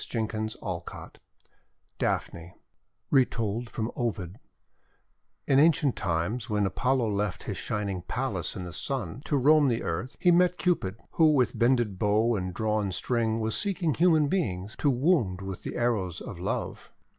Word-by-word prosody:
DAPHNE 110 Hz, -2 st, -2 dB
333 105 Hz, -5 st, -6 dB, 0.8 s
DAPHNE 85 Hz, +1 st, -2 dB, 0.6 s
Retold 120 Hz, -4 st, +1 dB
from 110 Hz, +1 st, -3 dB
Ovid 105 Hz, -4 st, -3 dB, 1.1 s
IN 135 Hz, -1 st, +4 dB
ancient 150 Hz, -3 st, +4 dB
times, 95 Hz, +7 st, -2 dB
when 105 Hz, -1 st, +1 dB
Apollo 125 Hz, +2 st, +1 dB
left 100 Hz, -2 st, -2 dB
his -, -, -4 dB
Shining 100 Hz, -3 st, -3 dB
Palace -, -, -3 dB
in 95 Hz, -, -5 dB
the 90 Hz, -1 st, -7 dB
Sun, 125 Hz, -, -4 dB
to 145 Hz, -, +1 dB
roam 145 Hz, +2 st, +5 dB
the 120 Hz, -2 st, 0 dB
earth, 95 Hz, +11 st, -4 dB
he 180 Hz, -, +4 dB
met 180 Hz, 0 st, +4 dB
Cupid, 165 Hz, -, 0 dB, 0.2 s
who 160 Hz, -2 st, +4 dB
with 130 Hz, -4 st, +1 dB
bended 120 Hz, -5 st, +2 dB
bow 110 Hz, +3 st, +2 dB
and 90 Hz, -2 st, -3 dB
drawn 105 Hz, +1 st, -1 dB
string 115 Hz, +2 st, 0 dB
was 110 Hz, 0 st, -1 dB
seeking 185 Hz, -6 st, 0 dB
human 160 Hz, -3 st, +4 dB
beings 105 Hz, -, -2 dB
to 145 Hz, -, +2 dB
wound 125 Hz, -, +2 dB
with 95 Hz, -2 st, -6 dB
the -, -, -6 dB
arrows 105 Hz, -8 st, 0 dB
of -, -, -8 dB
love. -, -, -4 dB
115 Hz, 150 wpm, -28 LUFS, 95-135 Hz, 1.1 s, roam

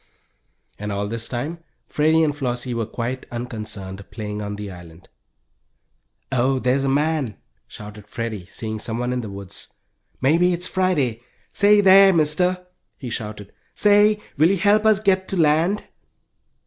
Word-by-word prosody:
And 105 Hz, 0 st, -4 dB
all 100 Hz, +1 st, -2 dB
this 115 Hz, +2 st, -3 dB
time 145 Hz, +8 st, -4 dB, 0.3 s
Freddie 160 Hz, +2 st, +2 dB
and 150 Hz, -2 st, 0 dB
Flossie 125 Hz, -3 st, -3 dB
were 115 Hz, -2 st, -2 dB
quite 120 Hz, +3 st, -4 dB
unconcerned 110 Hz, -5 st, -6 dB
playing 105 Hz, -2 st, -5 dB
on 105 Hz, 0 st, -4 dB
the 100 Hz, -1 st, -7 dB
island. 85 Hz, -1 st, -13 dB, 1.2 s
"Oh, 130 Hz, +1 st, +2 dB
there's 130 Hz, +2 st, +1 dB
a 135 Hz, -, +1 dB
man!" 145 Hz, -5 st, 0 dB, 0.3 s
shouted 105 Hz, 0 st, -11 dB
Freddie, 110 Hz, -5 st, -5 dB
seeing 110 Hz, +1 st, -5 dB
someone 120 Hz, +3 st, -3 dB
in 125 Hz, -, -2 dB
the 110 Hz, -, -7 dB
woods. 100 Hz, -2 st, -10 dB, 0.5 s
"Maybe 165 Hz, +7 st, +3 dB
it's 175 Hz, +1 st, -3 dB
Friday. 155 Hz, -13 st, 0 dB, 0.3 s
Say 205 Hz, 0 st, +5 dB
there, 195 Hz, 0 st, +7 dB
Mister!" 180 Hz, +3 st, +1 dB, 0.3 s
he 125 Hz, -3 st, -7 dB
shouted. 105 Hz, -2 st, -6 dB, 0.2 s
"Say, 210 Hz, 0 st, +4 dB, 0.2 s
will 155 Hz, +4 st, +5 dB
you 195 Hz, -, +2 dB
help 210 Hz, +4 st, +3 dB
us 215 Hz, -2 st, +4 dB
get 190 Hz, -3 st, +1 dB
to 195 Hz, -, -2 dB
land?" 165 Hz, +6 st, +2 dB
130 Hz, 150 wpm, -22 LUFS, 110-175 Hz, 1.2 s, there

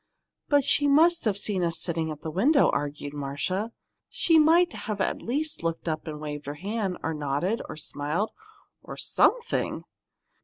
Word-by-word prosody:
"But 285 Hz, -1 st, +4 dB
she 290 Hz, +2 st, +4 dB
must 325 Hz, +3 st, +4 dB
have 205 Hz, -3 st, +1 dB
seen 200 Hz, -2 st, -1 dB
us 165 Hz, -1 st, 0 dB
sitting 165 Hz, -2 st, -1 dB
in 155 Hz, -, -5 dB
the 160 Hz, -, -4 dB
window," 275 Hz, -, +4 dB
argued 145 Hz, 0 st, -3 dB
Marcia. 145 Hz, +10 st, -2 dB, 0.4 s
"She 325 Hz, -2 st, +3 dB
might 335 Hz, +3 st, +5 dB, 0.2 s
at 195 Hz, -, -1 dB
least 295 Hz, +6 st, -1 dB
have -, -, -11 dB
looked 165 Hz, 0 st, -3 dB
up 155 Hz, 0 st, -3 dB
and 150 Hz, -1 st, -5 dB
waved 150 Hz, -1 st, -6 dB
her 145 Hz, -, -4 dB
hand, 195 Hz, +2 st, -3 dB
or 160 Hz, -, -1 dB
nodded, 150 Hz, +8 st, -1 dB
or -, -, -7 dB
smiled 155 Hz, +7 st, -2 dB, 0.5 s
or -, -, -9 dB
something!" 485 Hz, -1 st, +1 dB
180 Hz, 165 wpm, -27 LUFS, -, 0.5 s, might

